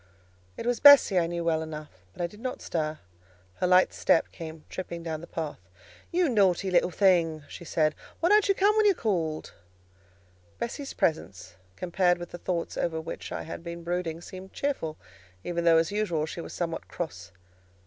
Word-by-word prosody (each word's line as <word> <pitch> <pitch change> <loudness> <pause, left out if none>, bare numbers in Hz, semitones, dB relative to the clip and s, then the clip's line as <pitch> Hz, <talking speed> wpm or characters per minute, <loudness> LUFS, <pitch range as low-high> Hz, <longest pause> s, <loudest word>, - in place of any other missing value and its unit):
It - - -5
was 245 0 +1
Bessie, 285 -10 +8
I 165 - +1
knew 170 0 -3
well 160 -1 +1
enough; 155 -1 -7 0.2
but 175 - -5
I - - +2
did 205 +5 -9
not 255 +2 -4
stir; 155 -2 -2 0.6
her 180 - +1
light 180 +1 +5
step 165 - +2
came 160 -1 -9
tripping 170 -2 -6
down 160 -2 -4
the 170 - -10
path. 155 - -5 0.5
"You 355 0 +2
naughty 195 - +2
little 175 0 +4
thing!" 170 -5 +2
she - - -10
said. 155 -2 +1 0.3
"Why 340 - +2
don't 420 0 +5
you 395 - +4
come 410 +3 +3
when 430 -1 +4
you 400 - +6
are - - -20
called?" 165 - -2 1.0
Bessie's 275 +4 -4
presence, 95 - -1 0.2
compared 180 0 +1
with 175 0 -8
the 175 - -7
thoughts 170 -2 -3
over 160 -1 -1
which 160 - -7
I - - -4
had 165 - -7
been 170 0 -7
brooding, 170 -1 -2
seemed 185 +2 -10
cheerful; 215 - -2 0.5
even 170 -1 -2
though, 165 -1 +6
as 165 +2 +2
usual, 190 -7 0
she 165 +2 -6
was - - -8
somewhat 165 -2 -4
cross. 90 - -6
170 Hz, 190 wpm, -28 LUFS, 160-195 Hz, 1.0 s, Bessie